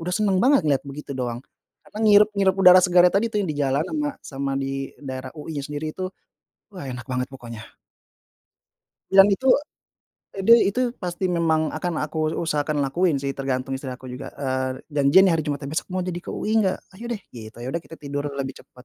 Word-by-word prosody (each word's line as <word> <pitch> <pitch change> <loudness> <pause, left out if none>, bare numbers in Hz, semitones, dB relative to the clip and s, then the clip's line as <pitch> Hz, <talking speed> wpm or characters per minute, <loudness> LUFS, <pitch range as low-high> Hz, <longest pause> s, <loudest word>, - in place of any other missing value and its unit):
senang 200 -3 +2
banget 275 -3 +5
ngelihat 140 -3 +1
begitu 140 +1 -7
doang. 125 -3 -3 0.4
Karena 210 - -12
ngirep 210 0 +7
ngirup 190 -2 +3
udara 185 -1 +8
segarnya 180 -1 +5
tadi 215 +4 +3
tuh 210 - 0
yang 180 - -3
di 145 - -7
jalan, 140 +1 +1
ama 295 -1 -1
sama 135 0 -4
di 135 0 -3
daerah 130 -2 -6
UI-nya 150 -1 -5
sendiri 150 +1 -4
itu, 185 - -6 0.7
wah 180 -6 -8
enak 125 -2 -6
banget 125 0 -2
pokoknya. 115 -4 -9 1.5
Dan 195 0 +8
itu 260 +7 -2 0.9
eee, 195 - -3
dia 230 +3 +8
itu 205 +6 -1 0.2
pasti 180 0 -4
memang 160 -2 +1
akan 170 +2 -3
aku 155 0 -2
usahakan 150 -2 0
lakuin 170 +3 +1
sih 140 - -1
tergantung 135 -1 -3
istri 130 0 -7
aku 130 +1 -11
juga, 130 +2 -7
eee, 130 -2 -1 0.2
janjian 145 +6 +5
nih 185 - +4
hari 165 -1 +1
Jumatnya, 145 -1 -3
"Besok - - -2
mau 185 0 -1
jadi 175 -1 -4
UI - - -3
enggak? 190 -4 +1 0.2
Ayo 230 - -10
deh," 210 - -5
gitu. 110 -2 -10
Ya 125 - -5
udah 170 - -3
kita 165 - -11
tidur 145 0 -5
lebih 135 -1 -3
cepat. 125 0 -18
150 Hz, 195 wpm, -23 LUFS, 135-185 Hz, 1.5 s, udara